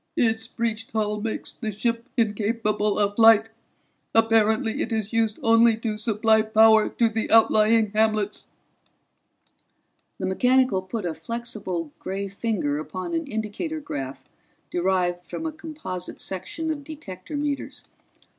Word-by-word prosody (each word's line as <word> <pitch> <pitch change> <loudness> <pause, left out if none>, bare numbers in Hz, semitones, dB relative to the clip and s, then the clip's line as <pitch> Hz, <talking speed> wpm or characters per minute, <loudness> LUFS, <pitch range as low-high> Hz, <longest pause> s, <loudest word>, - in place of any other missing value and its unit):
"Its 225 -1 +1
breached 225 -2 -3
hull 210 -1 -1
makes 225 0 -4
the 220 -3 -4
ship 230 +4 -2
incapable 210 -1 0
of 205 -1 +1
flight. 225 -1 +6 0.7
Apparently 225 +1 +3
it 235 - -3
is 220 -1 -2
used 225 -2 +1
only 230 0 +5
to 225 -1 -3
supply 220 0 +2
power 220 0 +5
to 235 - +2
the 220 0 -2
outlying 220 -1 +4
hamlets." 215 -1 0 1.7
The - - -3
mechanical 250 +1 +2
put 190 +2 -5
a 170 - -1
flexible 190 -4 -5
gray 195 +1 -4
finger 195 -8 -2
upon 185 - -5
an 330 -2 -2
indicator 220 +9 -4
graph 135 - -6 0.5
derived 180 -1 0
from 320 - -6
a 320 - -1
composite 310 - -7
section 315 - -4
of 290 -2 -5
detector 285 - -8
meters. 285 -1 -3
220 Hz, 130 wpm, -24 LUFS, 200-230 Hz, 1.7 s, flight